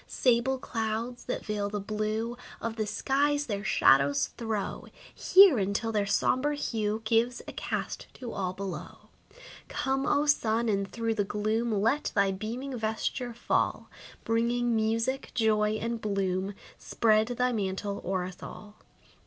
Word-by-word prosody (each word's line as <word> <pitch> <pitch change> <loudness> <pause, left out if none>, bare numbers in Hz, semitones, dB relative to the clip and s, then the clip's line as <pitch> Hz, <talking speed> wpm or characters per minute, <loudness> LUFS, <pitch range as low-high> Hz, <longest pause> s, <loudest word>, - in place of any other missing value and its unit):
Sable 255 +1 +2
clouds, 230 0 -3
that - - -4
veil 210 -1 -2
the 205 0 -3
blue 215 +3 -2 0.2
Of 230 0 -3
the 215 -2 -2
skies, 285 +6 +1
their 205 -4 -3
shadows 140 -6 +4
throw 220 -3 -3 0.3
Here, 370 - +7
until 200 +3 -1
their 205 -2 0
sombre 285 +8 +1
hue 220 -5 -2
Gives 230 +2 +2
a - - -7
cast - - -4
to 245 -3 -7
all 185 -2 -2
below. 190 -1 -7 0.6
Come, 270 0 -1
O 290 +1 +3
sun, 230 -5 +2
and 200 -1 0
through 230 -1 -1
the 210 -2 0
gloom 215 +3 -1
Let 275 +7 +1
thy 200 -1 +3
beaming 235 +7 -4
vesture 225 +2 -2
fall! 240 - -1 0.3
Bringing 235 +1 +1
music, 230 +4 0
joy 215 -2 +2
and 230 +1 -3
bloom, 195 -1 -1 0.2
Spread 215 -1 +2
thy 250 +1 0
mantle 200 -2 -2
o'er 185 -1 -1
us 180 0 -8
all. 210 0 -10
220 Hz, 145 wpm, -29 LUFS, 205-240 Hz, 0.6 s, Here